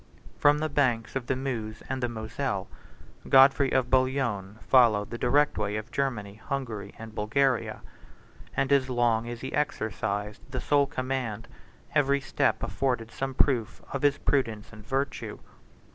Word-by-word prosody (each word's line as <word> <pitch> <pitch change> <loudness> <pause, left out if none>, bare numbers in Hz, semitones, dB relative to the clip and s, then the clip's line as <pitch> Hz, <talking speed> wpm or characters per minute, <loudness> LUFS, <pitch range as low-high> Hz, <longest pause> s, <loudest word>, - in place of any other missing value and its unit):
From 145 0 +5
the 155 +1 -1
banks 130 -7 0
of 130 -2 -3
the 130 - +1
Meuse 115 -5 -4
and 130 0 -3
the 120 - 0
Moselle, 110 -2 -3 0.6
Godfrey 135 +1 +6
of 130 -1 +1
Bouillon 130 -7 +1
followed 115 -6 +4
the 120 - -4
direct 145 +1 +2
way 105 0 -1
of 110 +2 -5
Germany, 110 -7 -2
Hungary, 115 -8 -4
and 110 -1 -9
Bulgaria; 125 +4 0 0.8
and, 135 - +1
as 135 -2 +3
long 120 -2 +1
as 120 -1 -6
he 130 - -5
exercised 105 -6 -2
the 130 -1 -3
sole 145 +2 +3
command 125 -5 -3 0.5
every 140 -1 +3
step 135 - 0
afforded 125 -4 -1
some 135 +2 -4
proof 125 -7 +1
of 140 - -2
his 145 0 +3
prudence 115 -7 -1
and 105 0 -12
virtue. 135 +5 -2
125 Hz, 150 wpm, -28 LUFS, 110-135 Hz, 0.8 s, Godfrey